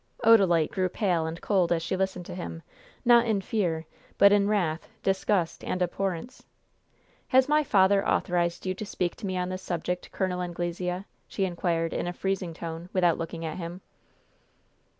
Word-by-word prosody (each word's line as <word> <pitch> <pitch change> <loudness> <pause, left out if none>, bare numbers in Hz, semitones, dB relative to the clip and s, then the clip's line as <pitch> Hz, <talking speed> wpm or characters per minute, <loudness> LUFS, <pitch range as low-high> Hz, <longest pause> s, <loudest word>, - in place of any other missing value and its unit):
Odalite 190 -8 +5
grew 185 -1 0
pale 175 -5 0
and 165 +1 -5
cold 185 -4 +2
as 165 -1 +1
she 170 - -1
listened 190 -2 -2
to - - -7
him, 85 - -6 0.4
not 240 0 +6
in 215 -3 +2
fear, 180 -6 -1 0.3
but 200 0 +7
in 200 -1 +4
wrath, 175 -6 0 0.2
disgust 190 -2 0
and 185 - -2
abhorrence. 185 +5 -3 0.8
"Has 260 0 +4
my 300 +1 +3
father 195 -5 +4
authorized 175 -1 0
you 185 - 0
to 190 - -6
speak 180 -3 -2
to 215 - -5
me 185 -1 -2
on 180 0 -1
this 185 0 -4
subject, 180 0 -3
Col. 185 -2 -1
Anglesea?" 180 +1 -3 0.2
she 195 - -1
inquired, 170 -2 -1
in - - -2
a 175 - -2
freezing 185 -3 -2
tone, 165 +1 -6
without 175 -3 +3
looking 165 0 -5
at 155 - -4
him. 175 +1 -6
180 Hz, 170 wpm, -27 LUFS, 170-195 Hz, 0.8 s, but